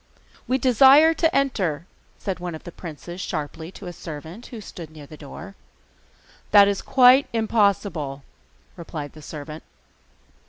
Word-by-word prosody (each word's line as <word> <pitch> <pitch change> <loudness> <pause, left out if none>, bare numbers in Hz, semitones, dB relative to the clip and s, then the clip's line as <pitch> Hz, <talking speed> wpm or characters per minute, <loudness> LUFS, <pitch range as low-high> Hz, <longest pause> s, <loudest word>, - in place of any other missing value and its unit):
'We 260 - +2
desire 270 +5 +6
to 325 0 +1
enter,' 190 - 0 0.3
said 190 -3 -4
one 175 -2 -5
of 155 - -11
the 175 - -9
princes 175 +2 -9
sharply 160 0 -5
to 205 - -11
a 175 - -6
servant 165 +8 -9
who 235 - -9
stood 175 -6 -10
near 155 -2 -12
the 155 - -12
door. 160 +6 -10 1.0
'That 200 -1 +7
is 200 -1 -1
quite 260 +1 +5
impossible,' 200 -10 0 0.5
replied 155 -4 -7
the 155 - -13
servant. 150 +1 -8
180 Hz, 145 wpm, -23 LUFS, 155-225 Hz, 1.0 s, That